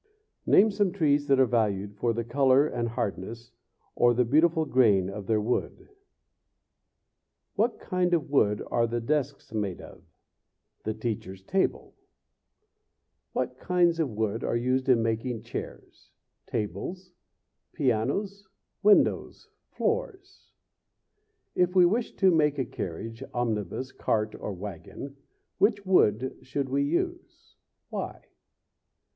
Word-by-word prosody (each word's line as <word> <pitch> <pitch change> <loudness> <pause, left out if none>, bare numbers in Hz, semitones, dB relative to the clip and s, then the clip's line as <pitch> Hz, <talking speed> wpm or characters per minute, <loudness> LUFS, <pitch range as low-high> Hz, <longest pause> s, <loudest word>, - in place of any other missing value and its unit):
Name 215 +2 +6
some 200 -2 +1
trees 145 -6 +1
that 135 -1 +4
are 130 - +6
valued 105 -4 0
for 115 +3 0
the 115 +1 -2
color 135 +3 +4
and 120 -6 -2
hardness, 115 0 -4 0.4
or 120 0 +3
the 125 +1 +3
beautiful 160 +5 +3
grain, 105 -9 +3
of 100 -1 -7
their 110 -1 +2
wood. 110 +4 -2 1.6
What 225 +4 0
kind 180 -2 0
of 150 -4 -3
wood 105 -7 +2
are 115 -1 +2
the 120 +1 -2
desks 135 -1 -2
made 100 -4 -2
of? - - -12 0.8
The 110 - -2
teacher's 105 -4 -5
table? 190 - -1 1.4
What - - -2
kinds 175 -2 +2
of 155 -4 +1
wood 110 0 -2
are - - -1
used 130 +2 0
in 120 -3 +4
making 115 0 -2
chairs? 115 - -8 0.4
tables? 170 - -4 0.6
pianos? 190 - -1 0.3
windows? 205 0 +3 0.2
floors? 455 -5 -3 1.0
If 180 +1 +1
we 180 -1 +7
wish 220 +7 0
to 190 -1 +4
make 150 -3 +2
a 135 - 0
carriage, 115 +5 -6
omnibus, 120 +1 -2
cart, 110 -1 -1
or - - -5
wagon, 100 - -8 0.4
which 205 -1 +2
wood 130 - +2
should 135 0 -3
we 140 +2 +1
use? 260 - -3 0.4
Why? - - -5
130 Hz, 125 wpm, -27 LUFS, 110-175 Hz, 1.6 s, we